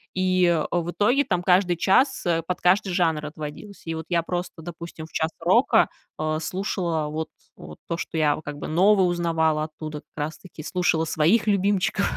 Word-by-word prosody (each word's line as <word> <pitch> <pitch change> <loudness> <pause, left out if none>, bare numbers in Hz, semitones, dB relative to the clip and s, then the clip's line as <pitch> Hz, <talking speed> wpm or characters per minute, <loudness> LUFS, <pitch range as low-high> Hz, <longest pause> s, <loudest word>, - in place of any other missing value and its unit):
И 185 -3 +2
в 175 0 -1
итоге 245 +10 +2
там 180 -7 -1
каждый 180 0 +3
час, 255 - +2
э, 165 -1 +1
под 180 - -3
каждый 190 +2 +3
жанр 160 -4 +1
отводилось. 155 +6 -8
И 165 - -2
вот 160 0 -6
я 170 -1 +2
просто, 175 -1 -5
допустим, 170 -1 -8
в - - -24
час 160 +1 -1
рока, 190 +10 +4 0.3
э, 155 0 0
слушала 170 -3 -2
вот 160 +1 -4 0.3
вот 75 0 -11
то, 170 - -2
что 165 - -5
я 150 -2 +3
вот 155 - -10
как 145 0 -6
бы - - -6
новое 190 +4 +4
узнавала 165 -3 +1
оттуда, 155 -1 -7
как - - -47 0.2
раз 155 0 -8
таки 170 -4 -11
слушала 165 -2 +1
своих 165 +9 +2
любимчиков. 200 0 +1
170 Hz, 185 wpm, -24 LUFS, 160-185 Hz, 0.3 s, рока